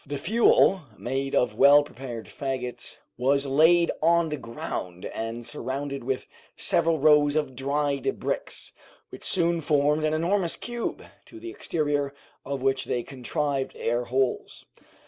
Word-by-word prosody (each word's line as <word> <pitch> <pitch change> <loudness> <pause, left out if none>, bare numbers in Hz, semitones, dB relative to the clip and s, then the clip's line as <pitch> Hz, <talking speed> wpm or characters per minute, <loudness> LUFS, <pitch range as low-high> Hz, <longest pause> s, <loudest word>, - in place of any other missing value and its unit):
The 145 0 -5
fuel, 195 +1 +4 0.2
made 135 +2 -2
of 120 -4 +2
well 145 +1 +8
prepared 120 -5 -8
fagots, 130 -3 -5 0.2
was 140 +2 +2
laid 160 +5 +4
on 170 0 +3
the 150 - -2
ground 95 -7 -6
and 115 +1 -5
surrounded 140 +1 -4
with 130 +1 -2 0.3
several 165 -1 +1
rows 150 0 +4
of 145 -4 -1
dried 140 +1 -1
bricks, - - -3 0.4
which - - -11
soon 170 -2 +1
formed 150 0 +2
an 155 0 +1
enormous 170 +2 +1
cube, 240 0 -4 0.2
to 335 - -12
the 350 +1 -7
exterior 145 - -1 0.3
of 140 -1 -4
which 135 -1 +1
they 120 - -1
contrived 135 +1 -3
air 120 +1 -1
holes. 130 +1 -1
140 Hz, 140 wpm, -26 LUFS, 130-155 Hz, 0.4 s, well